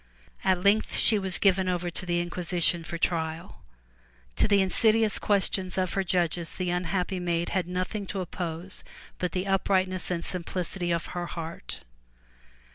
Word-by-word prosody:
At 185 Hz, -1 st, +2 dB
length 205 Hz, +2 st, +3 dB
she 215 Hz, -2 st, +6 dB
was 190 Hz, -2 st, +1 dB
given 190 Hz, -2 st, +3 dB
over 175 Hz, -1 st, -1 dB
to 180 Hz, -, -4 dB
the 175 Hz, 0 st, +1 dB
inquisition 175 Hz, -1 st, 0 dB
for 170 Hz, +1 st, -5 dB
trial. 165 Hz, -1 st, -2 dB, 0.8 s
To -, -, +4 dB
the 200 Hz, -1 st, +4 dB
insidious 215 Hz, +3 st, +3 dB
questions 190 Hz, -2 st, 0 dB
of 185 Hz, -2 st, 0 dB
her 195 Hz, -, +1 dB
judges 175 Hz, -2 st, 0 dB
the 180 Hz, -1 st, -1 dB
unhappy 180 Hz, +1 st, -1 dB
maiden 170 Hz, -1 st, -1 dB
had 185 Hz, -3 st, 0 dB
nothing 185 Hz, +3 st, -3 dB
to 195 Hz, -, -3 dB
oppose 175 Hz, 0 st, -4 dB, 0.4 s
but 180 Hz, -2 st, -1 dB
the 185 Hz, 0 st, -1 dB
uprightness 185 Hz, -1 st, +1 dB
and 170 Hz, -2 st, -2 dB
simplicity 180 Hz, 0 st, -3 dB
of 170 Hz, -1 st, 0 dB
her 175 Hz, -1 st, -3 dB
heart. 165 Hz, 0 st, -6 dB
180 Hz, 155 wpm, -28 LUFS, 175-190 Hz, 0.8 s, she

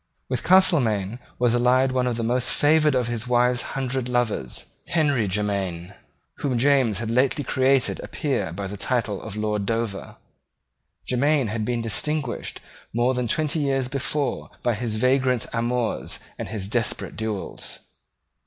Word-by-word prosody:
With -, -, -1 dB
Castelmaine 120 Hz, -, +4 dB, 0.2 s
was 120 Hz, -1 st, +2 dB
allied 125 Hz, +2 st, +3 dB
one 130 Hz, -1 st, +1 dB
of 120 Hz, -2 st, -1 dB
the 115 Hz, -, -2 dB
most 125 Hz, +2 st, +2 dB
favoured 150 Hz, -1 st, +4 dB
of 125 Hz, -2 st, +1 dB
his 120 Hz, 0 st, -3 dB
wife's 125 Hz, 0 st, +3 dB
hundred 130 Hz, -2 st, -3 dB
lovers, 115 Hz, -, -1 dB, 0.2 s
Henry 145 Hz, -10 st, +1 dB
Jermyn, 95 Hz, -3 st, -2 dB, 0.4 s
whom 130 Hz, -4 st, -1 dB
James 130 Hz, -5 st, +3 dB
had 115 Hz, +1 st, -3 dB
lately 130 Hz, +4 st, +2 dB
created 130 Hz, 0 st, +2 dB
a -, -, -7 dB
peer 120 Hz, -, -2 dB
by 100 Hz, +4 st, -5 dB
the 100 Hz, +2 st, -6 dB
title 110 Hz, -3 st, -1 dB
of 105 Hz, -2 st, -8 dB
Lord 105 Hz, -2 st, -1 dB
Dover. 115 Hz, -3 st, -3 dB, 0.9 s
Jermyn 140 Hz, -1 st, +2 dB
had 110 Hz, 0 st, -2 dB
been 120 Hz, -1 st, -1 dB
distinguished 135 Hz, +4 st, -1 dB, 0.3 s
more 120 Hz, +3 st, +1 dB
than 125 Hz, -1 st, -1 dB
twenty 155 Hz, +4 st, +1 dB
years 135 Hz, -3 st, 0 dB
before 140 Hz, +1 st, -2 dB
by 120 Hz, -, +2 dB
his 110 Hz, 0 st, -2 dB
vagrant 125 Hz, +1 st, +2 dB
amours 120 Hz, 0 st, -1 dB, 0.2 s
and -, -, -5 dB
his 100 Hz, -1 st, -5 dB
desperate 115 Hz, +1 st, -1 dB
duels. 110 Hz, -3 st, -4 dB
120 Hz, 150 wpm, -24 LUFS, 110-130 Hz, 0.9 s, Castelmaine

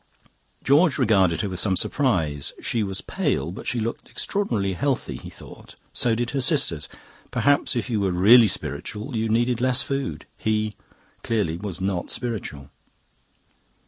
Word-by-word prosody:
"George 150 Hz, +3 st, +4 dB
regarded 95 Hz, -, +3 dB
her 105 Hz, -, -2 dB
with 90 Hz, -, -4 dB
some 95 Hz, -3 st, +1 dB
surprise. 85 Hz, -, 0 dB
She 115 Hz, -, -1 dB
was 95 Hz, -2 st, -3 dB
pale, 75 Hz, +5 st, -1 dB
but 95 Hz, -, -8 dB
she 125 Hz, -, 0 dB
looked 115 Hz, +1 st, -4 dB
extraordinarily 115 Hz, -, -1 dB
healthy, 135 Hz, +7 st, -1 dB
he -, -, -9 dB
thought; -, -, -13 dB, 0.2 s
so 115 Hz, -2 st, +2 dB
did 120 Hz, +1 st, -2 dB
her 135 Hz, -1 st, 0 dB
sisters. 125 Hz, -, +1 dB, 0.4 s
Perhaps 145 Hz, -1 st, +2 dB
if 120 Hz, -, -1 dB
you 115 Hz, -4 st, 0 dB
were 100 Hz, -1 st, +1 dB
really 105 Hz, +6 st, +7 dB
spiritual 110 Hz, +5 st, -4 dB
you 110 Hz, 0 st, 0 dB
needed 120 Hz, +2 st, +1 dB
less 130 Hz, 0 st, +2 dB
food. 135 Hz, -1 st, -3 dB
He, 110 Hz, -1 st, 0 dB, 0.5 s
clearly, 105 Hz, -8 st, 0 dB
was 95 Hz, -2 st, -5 dB
not 95 Hz, -2 st, -2 dB
spiritual. 100 Hz, -, -5 dB
110 Hz, 150 wpm, -24 LUFS, 95-125 Hz, 0.5 s, really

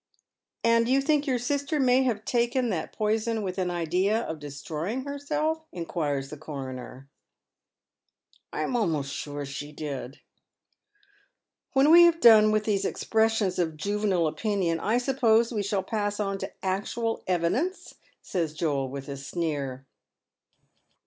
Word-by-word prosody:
" -, -, -56 dB
And 230 Hz, 0 st, +3 dB
you 265 Hz, +1 st, +4 dB
think 290 Hz, +1 st, +1 dB
your 255 Hz, -2 st, +2 dB
sister 285 Hz, +5 st, -1 dB
may 255 Hz, -1 st, +4 dB
have 230 Hz, -5 st, -1 dB
taken 240 Hz, 0 st, +1 dB
that 165 Hz, -4 st, -3 dB
poison 220 Hz, +1 st, 0 dB
with 185 Hz, 0 st, -3 dB
an 180 Hz, -1 st, 0 dB
idea 180 Hz, +6 st, +1 dB
of 160 Hz, -8 st, -5 dB
destroying 155 Hz, -, -4 dB
herself? 295 Hz, +3 st, -2 dB
" -, -, -52 dB
inquires 150 Hz, -6 st, -3 dB
the 150 Hz, -, -7 dB
coroner. 135 Hz, -3 st, -7 dB, 0.7 s
*' -, -, -39 dB
I -, -, -3 dB
am 255 Hz, -, -2 dB
almost 155 Hz, -, 0 dB
sure 145 Hz, -1 st, -5 dB
she 140 Hz, +2 st, -6 dB
did." 140 Hz, -3 st, -6 dB, 0.8 s
" 405 Hz, 0 st, -39 dB
When 275 Hz, +3 st, +5 dB
we 340 Hz, +1 st, +10 dB
have 335 Hz, -1 st, +3 dB
done 220 Hz, -5 st, +8 dB
with 215 Hz, 0 st, +2 dB
these 205 Hz, -3 st, 0 dB
expressions 220 Hz, -4 st, +1 dB
of 160 Hz, -3 st, -1 dB
juvenile 200 Hz, 0 st, 0 dB
opinion 180 Hz, -1 st, 0 dB
I 220 Hz, +7 st, +1 dB
suppose 240 Hz, -3 st, +3 dB
we 210 Hz, -, 0 dB
shall 200 Hz, -1 st, -1 dB
pass 205 Hz, 0 st, -2 dB
on 195 Hz, -1 st, -1 dB
to -, -, -5 dB
actual 210 Hz, +4 st, -2 dB
evidence? 185 Hz, -, -1 dB, 0.2 s
" -, -, -39 dB
says 165 Hz, -5 st, -2 dB
ioel, 140 Hz, -5 st, 0 dB
with 135 Hz, 0 st, -7 dB
a 140 Hz, -1 st, -5 dB
sneer. 140 Hz, -3 st, -3 dB
205 Hz, 155 wpm, -27 LUFS, 155-240 Hz, 0.8 s, we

